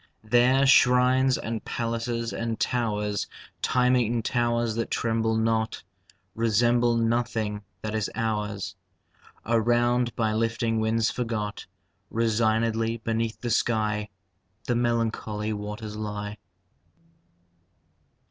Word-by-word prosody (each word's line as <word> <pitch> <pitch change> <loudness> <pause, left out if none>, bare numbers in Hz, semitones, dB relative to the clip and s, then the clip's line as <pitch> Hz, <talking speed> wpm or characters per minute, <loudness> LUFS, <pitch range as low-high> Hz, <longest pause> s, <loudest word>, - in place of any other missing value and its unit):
There 125 +4 +4
shrines 130 0 +5
and 115 -1 -4
palaces 115 0 -2
and 115 -1 -3
towers 105 -4 -1 0.3
(Time 125 0 +3
eaten 120 -1 +1
towers 120 -1 0
that 115 +1 -2
tremble 115 -1 0
not!) 110 0 0 0.5
Resemble 120 +1 +2
nothing 115 -2 0 0.2
that 110 0 -3
is 110 -2 -1
ours. 105 -3 -2 0.7
Around, 120 +1 +2
by 110 -2 0
lifting 115 0 0
winds 110 0 +1
forgot, 110 -4 -3 0.4
Resignedly 115 0 +1
beneath 115 0 -2
the 120 - -2
sky 105 -2 0 0.5
The 120 - 0
melancholy 115 -3 -1
waters 105 +1 -6
lie. 105 0 -5
115 Hz, 100 wpm, -26 LUFS, 110-120 Hz, 0.7 s, shrines